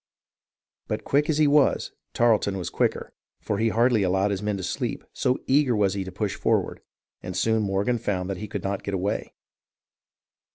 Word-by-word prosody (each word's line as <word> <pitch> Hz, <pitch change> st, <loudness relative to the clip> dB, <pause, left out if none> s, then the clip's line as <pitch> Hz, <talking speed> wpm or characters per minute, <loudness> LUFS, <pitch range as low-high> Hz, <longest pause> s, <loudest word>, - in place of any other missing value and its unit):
But -, -, -3 dB
quick 145 Hz, +2 st, +1 dB
as 155 Hz, -, +2 dB
he 155 Hz, -, +4 dB
was, 145 Hz, 0 st, +3 dB, 0.2 s
Tarleton 110 Hz, -4 st, +2 dB
was 90 Hz, -, -4 dB
quicker; -, -, -1 dB, 0.3 s
for 100 Hz, -, -2 dB
he 115 Hz, +1 st, +2 dB
hardly 115 Hz, 0 st, +3 dB
allowed 95 Hz, +2 st, +1 dB
his 100 Hz, -1 st, -2 dB
men 105 Hz, -1 st, -1 dB
to 95 Hz, -, -6 dB
sleep, 85 Hz, -, -3 dB
so 125 Hz, 0 st, +1 dB
eager 135 Hz, -3 st, +3 dB
was 100 Hz, -3 st, +2 dB
he 100 Hz, -1 st, -2 dB
to 95 Hz, -, -8 dB
push 100 Hz, +1 st, -2 dB
forward, -, -, 0 dB, 0.4 s
and 90 Hz, 0 st, -5 dB
soon 110 Hz, +3 st, +2 dB
Morgan 100 Hz, +4 st, 0 dB
found 95 Hz, -4 st, -2 dB
that 100 Hz, -1 st, -3 dB
he 105 Hz, -, -6 dB
could -, -, -5 dB
not 100 Hz, 0 st, -2 dB
get 100 Hz, -, -3 dB
away. 95 Hz, +2 st, -3 dB
105 Hz, 190 wpm, -25 LUFS, 95-120 Hz, 0.4 s, he